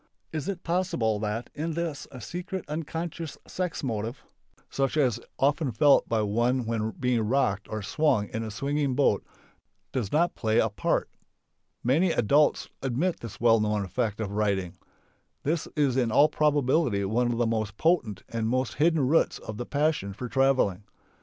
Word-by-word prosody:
Is 155 Hz, +2 st, -3 dB
it 185 Hz, -3 st, -4 dB
possible 165 Hz, -, 0 dB
that 110 Hz, +3 st, -3 dB
in 160 Hz, +2 st, -3 dB
this 165 Hz, -3 st, -3 dB
a 130 Hz, -, -9 dB
secret 180 Hz, -, -5 dB
(unconscious) 165 Hz, +1 st, -4 dB
sex 180 Hz, -4 st, -3 dB
motive, 115 Hz, 0 st, -3 dB, 0.4 s
such 135 Hz, +2 st, -1 dB
as 125 Hz, -6 st, +2 dB
is -, -, -18 dB
often 145 Hz, 0 st, +1 dB
felt 140 Hz, +6 st, +4 dB
by 110 Hz, -2 st, +1 dB
one 120 Hz, +4 st, +1 dB
when 110 Hz, -1 st, -1 dB
being 125 Hz, -3 st, +1 dB
rocked 105 Hz, -4 st, +1 dB
or 110 Hz, -1 st, -4 dB
swung 110 Hz, -4 st, +1 dB
in 110 Hz, -, -3 dB
a 110 Hz, -, -4 dB
swinging 140 Hz, +4 st, -1 dB
boat, 130 Hz, -7 st, +2 dB, 0.7 s
does 115 Hz, -7 st, -2 dB
not 170 Hz, +3 st, +2 dB
play 110 Hz, -1 st, 0 dB
a 110 Hz, -, +4 dB
part? 100 Hz, -, 0 dB, 0.8 s
Many 155 Hz, +10 st, +3 dB
adults 145 Hz, +4 st, +3 dB
admit 135 Hz, +8 st, 0 dB
this 115 Hz, -3 st, -9 dB
well 115 Hz, -1 st, +5 dB
known 105 Hz, -1 st, 0 dB
effect 105 Hz, +3 st, -2 dB
of 105 Hz, -3 st, -3 dB
riding. 100 Hz, -4 st, 0 dB, 0.7 s
This 160 Hz, +2 st, -1 dB
is 140 Hz, -5 st, +2 dB
in 125 Hz, -4 st, +1 dB
all 145 Hz, +7 st, +6 dB
probability 145 Hz, -7 st, +2 dB
one 120 Hz, +4 st, +1 dB
of 115 Hz, -, -2 dB
the 120 Hz, -, +2 dB
most 110 Hz, -2 st, -2 dB
potent 120 Hz, -, +1 dB
and 115 Hz, -1 st, -2 dB
most 130 Hz, +1 st, 0 dB
hidden 160 Hz, -4 st, +3 dB
roots 165 Hz, +4 st, +3 dB
of 110 Hz, -1 st, -8 dB
the 120 Hz, -, -5 dB
passion 145 Hz, -9 st, 0 dB
for 125 Hz, +5 st, -6 dB
travelling. 130 Hz, -7 st, +2 dB
125 Hz, 170 wpm, -27 LUFS, 110-150 Hz, 0.8 s, all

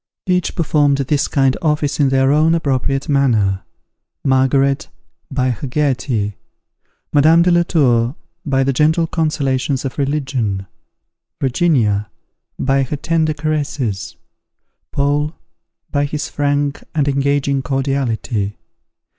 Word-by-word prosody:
Each 180 Hz, -1 st, 0 dB
performed 145 Hz, -3 st, +2 dB
this 140 Hz, +1 st, 0 dB
kind 135 Hz, -2 st, +2 dB
office 150 Hz, -2 st, 0 dB
in 140 Hz, -2 st, +4 dB
their 135 Hz, 0 st, +3 dB
own 155 Hz, +3 st, +4 dB
appropriate 135 Hz, -3 st, -1 dB
manner: 110 Hz, -10 st, +2 dB, 0.6 s
Margaret, 135 Hz, +1 st, +2 dB, 0.4 s
by 130 Hz, -2 st, 0 dB
her 125 Hz, +4 st, -5 dB
gaiety; 130 Hz, -7 st, -1 dB, 0.8 s
Madame 160 Hz, +3 st, +5 dB
de 180 Hz, -, +3 dB
la 175 Hz, 0 st, +4 dB
Tour, 125 Hz, -7 st, +2 dB, 0.3 s
by 135 Hz, -5 st, +1 dB
the 135 Hz, +1 st, +1 dB
gentle 160 Hz, +5 st, +3 dB
consolations 140 Hz, -5 st, -1 dB
of 135 Hz, -, -5 dB
religion; 130 Hz, -9 st, -1 dB, 0.7 s
Virginia, 120 Hz, -8 st, +1 dB, 0.5 s
by 135 Hz, 0 st, +1 dB
her 135 Hz, +2 st, -2 dB
tender 160 Hz, 0 st, 0 dB
caresses; 145 Hz, -9 st, -2 dB, 0.8 s
Paul, 145 Hz, +2 st, 0 dB, 0.6 s
by 145 Hz, -1 st, +1 dB
his 145 Hz, 0 st, -4 dB
frank 145 Hz, 0 st, -1 dB
and 145 Hz, -2 st, +1 dB
engaging 140 Hz, 0 st, +1 dB
cordiality. 130 Hz, -6 st, -2 dB
140 Hz, 115 wpm, -18 LUFS, 130-150 Hz, 0.8 s, Madame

